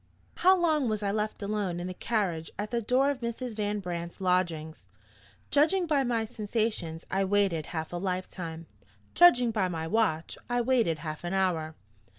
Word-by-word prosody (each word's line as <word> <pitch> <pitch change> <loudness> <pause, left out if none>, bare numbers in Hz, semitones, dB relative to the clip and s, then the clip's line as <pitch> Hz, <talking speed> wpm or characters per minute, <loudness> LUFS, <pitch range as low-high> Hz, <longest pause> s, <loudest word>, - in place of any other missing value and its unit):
HOW 375 +2 +5
long 310 -7 +2
was 215 -1 -1
I 200 - +1
left 215 0 -2
alone 200 -4 -2
in 175 - -4
the 185 - -4
carriage 180 -7 -1
at 210 +1 -4
the 235 -1 0
door 255 +5 +3
of 275 - -5
Mrs. 235 0 -4
Van 210 -1 -1
Brandt's 170 -2 -5
lodgings? 170 - -1 0.6
Judging 325 +6 +3
by 295 -4 +2
my 235 -3 0
sensations, 215 -7 -2
I 195 +1 +2
waited 195 -5 +1
half 160 -1 -5
a - - -2
life 185 0 -2
time. 165 -2 -7 0.5
Judging 250 -10 +6
by 205 -4 +1
my 165 -3 -3
watch, 165 -4 0
I 245 0 +1
waited 235 -9 +2
half 155 -1 -6
an 175 +1 -3
hour. 165 -5 0
205 Hz, 175 wpm, -29 LUFS, 170-235 Hz, 0.6 s, Judging